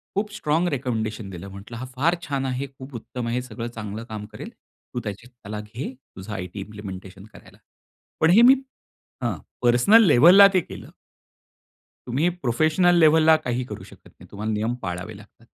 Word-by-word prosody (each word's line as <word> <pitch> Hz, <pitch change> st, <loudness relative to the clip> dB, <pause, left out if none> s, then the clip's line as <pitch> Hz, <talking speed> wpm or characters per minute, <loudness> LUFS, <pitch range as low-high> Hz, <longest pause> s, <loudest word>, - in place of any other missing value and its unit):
खूप 210 Hz, +1 st, -1 dB
strong 160 Hz, -1 st, 0 dB
recommendation 110 Hz, -, -3 dB
दिलं. 95 Hz, 0 st, -8 dB
म्हटलं, 100 Hz, +5 st, -10 dB
"हा 130 Hz, -, -6 dB
फार 160 Hz, +7 st, +2 dB
छान 140 Hz, -3 st, -2 dB
आहे, 130 Hz, +1 st, -3 dB
खूप 135 Hz, 0 st, -12 dB
उत्तम 120 Hz, +1 st, -6 dB
आहे, 120 Hz, +2 st, -1 dB
सगळं 120 Hz, -1 st, -6 dB
चांगलं 110 Hz, -2 st, -7 dB
काम 105 Hz, -1 st, -6 dB
करेल. -, -, -8 dB, 0.4 s
तू 125 Hz, -, -2 dB
त्याची 105 Hz, +2 st, -7 dB
त्याला 110 Hz, -4 st, -9 dB
घे. 115 Hz, +6 st, -7 dB, 0.2 s
तुझं 95 Hz, +3 st, -9 dB
आयटी 90 Hz, 0 st, -6 dB
इम्प्लिमेंटेशन 95 Hz, -1 st, -9 dB
करायला." -, -, -16 dB, 0.6 s
पण 160 Hz, -, +4 dB
हे 225 Hz, -, +7 dB
मी 255 Hz, +3 st, +8 dB, 0.7 s
हां, -, -, -1 dB, 0.3 s
पर्सनल 125 Hz, -, +6 dB
लेव्हलला 175 Hz, +7 st, +8 dB
ते 185 Hz, -, +5 dB
केलं. -, -, -11 dB, 1.2 s
तुम्ही 140 Hz, +8 st, +1 dB
प्रोफेशनल 175 Hz, +3 st, +2 dB
लेव्हलला 160 Hz, 0 st, +6 dB
काही 125 Hz, -4 st, -2 dB
करू -, -, -8 dB
शकत -, -, -16 dB
नाही. -, -, -18 dB
तुम्हाला 105 Hz, +2 st, -4 dB
नियम 110 Hz, +3 st, -1 dB
पाळावे 95 Hz, +4 st, -5 dB
लागतात. 105 Hz, +2 st, -18 dB
120 Hz, 165 wpm, -23 LUFS, 105-150 Hz, 1.2 s, मी